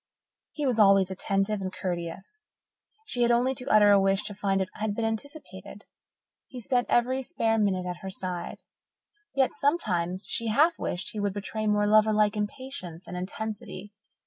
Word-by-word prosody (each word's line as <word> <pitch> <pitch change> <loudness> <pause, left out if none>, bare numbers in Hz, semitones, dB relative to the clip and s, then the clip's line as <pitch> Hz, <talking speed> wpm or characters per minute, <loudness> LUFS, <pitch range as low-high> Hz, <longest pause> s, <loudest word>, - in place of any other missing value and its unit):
He 295 - -3
was 245 -4 +1
always 195 -2 +5
attentive 195 +2 0
and 185 -1 -3
courteous. 185 - -5 0.6
She 245 - -3
had 240 - +4
only 245 +2 +3
to 255 0 -7
utter 210 -1 +6
a 200 -1 +6
wish 195 +1 +2
to 205 - -5
find 195 -1 0
that 190 -1 -1
it - - -16
had 215 -1 -1
been 230 - -1
anticipated; 220 - -6 0.6
he 255 - -9
spent 245 +1 0
every 255 +2 +2
spare 225 -3 0
minute 190 -3 +1
at 180 -1 -4
her 190 - -5
side. 180 -2 -5 0.7
Yet 265 -2 +2
sometimes 190 - -1
she 230 - -1
half 300 +10 +3
wished 175 - -3
he 215 - -5
would 205 -1 -1
betray 215 +2 -3
more 210 0 +2
lover 215 +1 +5
like 210 0 +3
impatience 205 -5 -5
and 180 - -8
intensity. 205 +1 -6
210 Hz, 175 wpm, -27 LUFS, 190-235 Hz, 0.7 s, utter